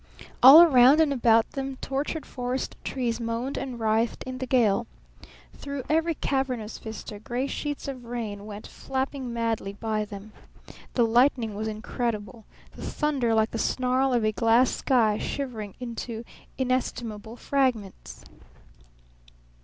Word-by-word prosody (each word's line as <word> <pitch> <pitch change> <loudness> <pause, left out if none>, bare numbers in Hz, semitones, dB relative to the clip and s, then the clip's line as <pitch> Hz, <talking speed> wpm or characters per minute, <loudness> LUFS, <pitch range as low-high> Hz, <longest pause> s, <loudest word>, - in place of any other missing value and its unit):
All 280 +7 +11
around 270 -2 +6
and 310 -3 +3
about 230 -3 +3
them 270 -1 -4
tortured 280 +4 -3
forest 250 +1 -4
trees 240 -3 -2
moaned 230 +3 -3
and 250 -3 -5
writhed 225 +1 0
in 255 0 -6
the 260 - -4
gale. 235 -3 +2 0.7
Through 280 -2 -6
every 325 +1 +1
cavernous 255 -6 -2
vista 220 -1 -8
gray 245 +4 -3
sheets 290 +1 -4
of 260 -3 -6
rain 215 -4 -5
went 210 0 -8
flapping 265 -1 -4
madly 230 -4 -2
by 215 0 -2
them. 205 +1 -10 0.6
The 240 - +4
lightning 235 -1 +2
was 215 +2 -4
incredible. 220 -1 -4 0.3
The - - -10
thunder 270 -7 0
like 220 0 +2
the 225 - -4
snarl 255 +2 +1
of 240 -3 +1
a 215 - +2
glass 230 +3 +3
sky 225 -5 +2
shivering 225 -8 -5
into 235 -1 -6 0.3
inestimable 240 -4 -2
fragments. 225 - -2
240 Hz, 135 wpm, -26 LUFS, 220-265 Hz, 0.7 s, All